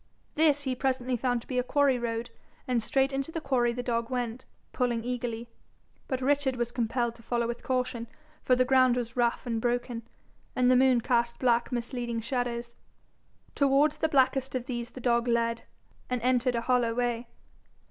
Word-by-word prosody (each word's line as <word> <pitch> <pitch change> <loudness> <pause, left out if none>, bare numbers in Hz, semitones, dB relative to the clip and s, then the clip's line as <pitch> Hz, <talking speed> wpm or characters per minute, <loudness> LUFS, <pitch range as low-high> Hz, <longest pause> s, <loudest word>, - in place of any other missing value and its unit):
This 295 -2 +3
he 260 -2 -1
presently 255 -1 -1
found 245 0 0
to - - -17
be 255 -1 0
a - - +1
quarry 275 -1 +2
road, 230 0 -3 0.4
and 245 -2 +1
straight 270 +3 +1
into 275 +3 -2
the 325 - -3
quarry 255 -5 +1
the 245 +1 -4
dog 235 -1 -1
went, 245 -1 -3 0.3
pulling 240 -3 0
eagerly; 240 -1 -3 0.6
but 260 -2 -2
Richard 280 0 +1
was 240 -1 -2
compelled 235 0 -1
to 230 - -17
follow 235 0 -1
with 235 0 -4
caution, 250 -2 -2 0.3
for 255 - +3
the 255 0 +3
ground 255 -1 +4
was 235 -1 -3
rough 240 0 +1
and 230 -2 -2
broken, 240 0 -1 0.5
and 250 0 +4
the - - +6
moon 255 -1 +4
cast 235 0 +1
black 240 -1 +2
misleading 240 -1 -3
shadows. 235 0 -3 0.8
Towards 280 +2 +3
the 320 - +1
blackest 265 -2 +2
of 250 -1 -2
these 240 -3 -4
the 255 - -10
dog 235 0 +2
led, 230 -1 0 0.4
and 250 -1 0
entered 250 0 +2
a 235 - 0
hollow 240 -1 +1
way. 240 -1 -1
245 Hz, 180 wpm, -28 LUFS, 235-260 Hz, 0.8 s, the